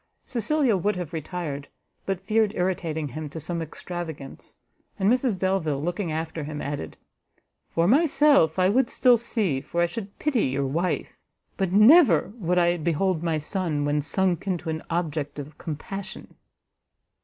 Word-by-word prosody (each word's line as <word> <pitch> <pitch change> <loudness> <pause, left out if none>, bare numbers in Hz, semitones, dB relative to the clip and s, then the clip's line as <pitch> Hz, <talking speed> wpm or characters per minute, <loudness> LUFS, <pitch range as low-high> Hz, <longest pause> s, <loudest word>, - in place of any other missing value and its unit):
Cecilia 260 0 +1
would 205 +3 0
have 180 -3 -5
retired, 155 -3 -4 0.4
but 195 -2 -1
feared 215 0 +2
irritating 165 -4 -1
him 150 +3 -6
to 160 - -7
some 170 +2 -3
extravagance; 160 -3 -7 0.4
and 190 - +1
Mrs 250 -5 +1
Delvile, 180 -6 0
looking 175 +3 -2
after 160 0 -3
him, 150 0 -5
added 145 - -5 0.7
"For 165 +1 +1
myself, 280 - +4
I 185 0 +4
would 240 +5 +2
still 250 -2 +5
see, 215 - -1
for 170 - -4
I 175 - +5
should 195 +3 -7
pity 275 -7 +1
your 135 +1 -1
wife, 165 +7 -2 0.4
but 190 -3 -1
NEVER 210 - +6
would 180 -4 0
I 175 0 +3
behold 170 +2 0
my 165 -2 0
son 155 -2 -2
when 145 0 +1
sunk 185 +4 0
into 175 -3 -2
an 160 0 -4
object 155 -4 -2
of 145 +1 -8
compassion!" 190 +5 -7
175 Hz, 155 wpm, -25 LUFS, 155-200 Hz, 0.7 s, NEVER